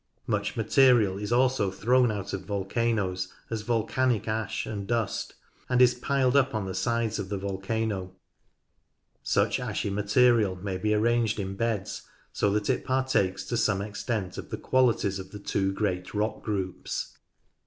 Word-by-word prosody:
Much 100 -2 -1
material 110 -4 +4
is 105 +2 -4
also 125 -4 +3
thrown 120 +6 +3
out 100 -2 -4
of 95 - -2
volcanoes 100 -2 -1 0.2
as 110 -1 -2
volcanic 120 +1 0
ash 110 -1 -2
and 100 -2 -5
dust, 115 -3 -2 0.3
and 125 -1 +2
is 125 -1 +6
piled 130 +1 +1
up 135 -3 +3
on 105 -2 -1
the 95 - -4
sides 115 +2 0
of 95 -2 -4
the 100 - -2
volcano. 95 0 -2 1.1
Such - - +1
ashy 100 - -2
material 105 0 +3
may 95 0 -4
be 105 +2 +1
arranged 115 0 +2
in 95 -1 -3
beds, 110 -2 -2 0.3
so 100 - +1
that 105 -1 0
it 130 - +1
partakes 130 -8 0
to 120 - -3
some 100 -4 +2
extent 105 -2 -3
of - - -8
the - - -4
qualities 120 -7 +2
of 95 0 -8
the 105 - -8
two 100 -1 -1
great 95 -2 -2
rock 105 +1 -1
groups. 95 -4 -4
105 Hz, 160 wpm, -27 LUFS, 100-120 Hz, 1.1 s, is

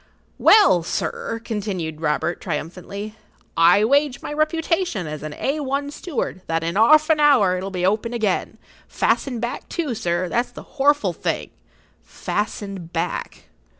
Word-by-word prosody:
"Well, 405 - +6
sir," 225 +6 -3
continued 185 -8 -4
Robert, 160 +2 -1
triumphantly, 185 +6 -5 0.4
"I 170 +5 +5
wager 280 +2 +2
my - - -4
reputation 325 - 0
as 155 0 -6
a 155 - -5
A1 280 - -2
steward, 290 - -4
that 165 0 -1
in 165 +1 -1
'arf[Pg 230 - +6
39] 320 - +1
an 310 - +3
hour 250 -12 +4
it - - -6
will 195 - -4
be 180 -2 -2
open 215 +4 0
again; 220 -6 -1 0.3
fastened 250 -5 0
back, 240 +1 -4
too, 310 -7 -2
sir, 185 -5 -1
that's 240 +7 0
the - - -11 0.2
horful 290 +2 +3
thing—fastened 200 -4 -5
back!" 165 -1 -3
210 Hz, 145 wpm, -22 LUFS, 175-280 Hz, 0.4 s, Well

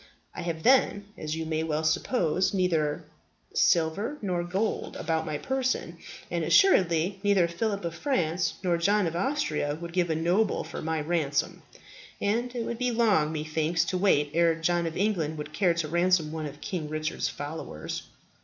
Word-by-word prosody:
I - - -6
have, 165 -2 -4
then, 250 -6 +4
as 155 0 -4
you 160 0 -3
may 160 0 -1
well 160 -1 -1
suppose, 180 +2 +1
neither 165 -5 +1 0.5
silver 170 - +2
nor 180 -4 -1
gold 190 +5 -2
about 160 -1 -1
my 150 -1 -2
person; 260 - -2 0.3
and - - -1
assuredly 185 - +4
neither 200 -4 +3
Philip 200 +3 -2
of 170 - -3
France 170 - 0
nor 175 -2 +1
John 200 +3 +3
of 165 0 -2
Austria 225 - -1
would 170 0 -7
give 175 -1 +1
a 160 - +1
noble 180 +6 +1
for - - -7
my 160 0 -1
ransom; 150 -3 -1 0.6
and 235 +5 -1
it 235 -2 -2
would 235 0 -4
be 250 0 +1
long, 215 -10 +2
methinks, 160 +1 0
to 185 0 -1
wait 150 -7 +3
ere 170 0 +3
John 170 +1 0
of 160 - -5
England 175 -6 0
would 150 0 -7
care 180 -4 +2
to 170 -2 -1
ransom 170 -1 +2
one 155 -1 -4
of 145 0 -11
King 165 -5 -4
Richard's 155 0 -2
followers." 145 - -6
170 Hz, 170 wpm, -27 LUFS, 160-200 Hz, 0.6 s, then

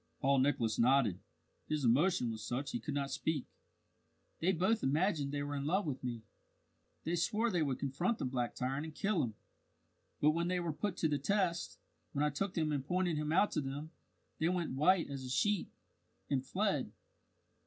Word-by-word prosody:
Paul 135 0 +3
Nicholas 125 -5 +1
nodded. 120 -6 +4 0.5
His 155 -2 -1
emotion 125 +1 +3
was 110 -1 -6
such 130 +5 -2
he 120 - -2
could 140 +6 -4
not 140 -1 -1
speak. 150 0 -1 0.9
"They 180 +3 +3
both 190 +6 +2
imagined 150 0 +1
they 145 0 -2
were 145 0 -3
in 140 0 -2
love 190 +5 +2
with 135 -4 -3
me. 120 -3 -4 0.8
They 170 - 0
swore 220 +6 +1
they 175 -4 +1
would 140 -4 0
confront 170 - 0
the - - -2
black 125 -2 -1
tyrant 135 +3 -1
and 155 - -10
kill 200 -4 +1
him; 110 -4 -2 0.8
but 150 - +5
when 170 +2 0
they 180 0 +1
were 170 -3 -2
put 190 +3 -2
to 160 - +2
the 145 -2 0
test 180 +1 0 0.4
when 145 0 +1
I 150 - +1
took 185 +7 -2
them 155 -2 +1
and 140 -3 -1
pointed 175 +1 0
him 150 0 -1
out 195 +5 +4
to - - 0
them 145 +3 -5 0.5
they 160 - +2
went 175 -2 -1
white 165 +6 +4
as 140 -2 -5
a 130 - -6
sheet, 205 +9 +1 0.6
and 130 -2 +2
fled." 195 +9 0
150 Hz, 195 wpm, -35 LUFS, 135-175 Hz, 0.9 s, but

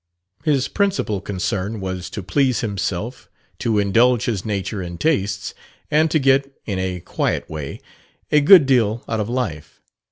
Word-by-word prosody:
His 140 -4 +2
principal 195 - 0
concern 100 +2 -3
was 95 -2 -4
to 105 - -6
please 125 +5 +1
himself, 105 +2 -3 0.3
to 115 -2 0
indulge 115 +4 +3
his 105 -6 -1
nature 100 -1 -3
and 85 -1 -7
tastes, 100 -10 0 0.4
and 155 +2 +4
to 155 - +2
get, 135 -1 +3
in 100 -3 -2
a 90 -1 -3
quiet - - -2
way, 75 -3 -6 0.5
"a 150 - +5
good 160 0 +8
deal 120 -4 +2
out 110 - -1
of 105 +1 -2
life." 105 - -4
110 Hz, 155 wpm, -21 LUFS, 95-135 Hz, 0.5 s, good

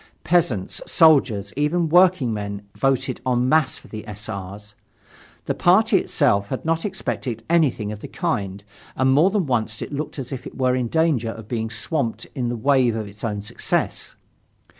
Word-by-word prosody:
Peasants, 155 - +1
soldiers, 130 - +4
even 155 +4 +1
workingmen 125 - +2
voted 135 -2 0
en 125 -1 +1
masse 155 -1 +2
for - - -16
the 110 0 -8
S. 105 0 -8
R.'s. 100 0 -7 0.7
The - - 0
party - - +4
itself 100 0 +1
had 130 - -5
not 165 +2 0
expected 130 - -4
anything 135 -11 +2
of 105 0 -8
the - - -7
kind, 100 - -3 0.3
and 130 0 +2
more 155 +7 +5
than 200 -3 0
once 110 -4 -1
it - - -6
looked 150 +2 -4
as 135 -2 -6
if 130 -2 -6
it - - -11
were 130 -1 +2
in 125 -2 0
danger 150 -5 +1
of 110 -1 -8
being 110 -2 -2
swamped 115 +2 -2
in 125 -3 -2
the 120 - -2
waves 125 -2 +2
of 110 -2 -4
its 100 +1 -14
own 105 -3 -2
success. 105 - -2
125 Hz, 175 wpm, -22 LUFS, 105-150 Hz, 0.7 s, more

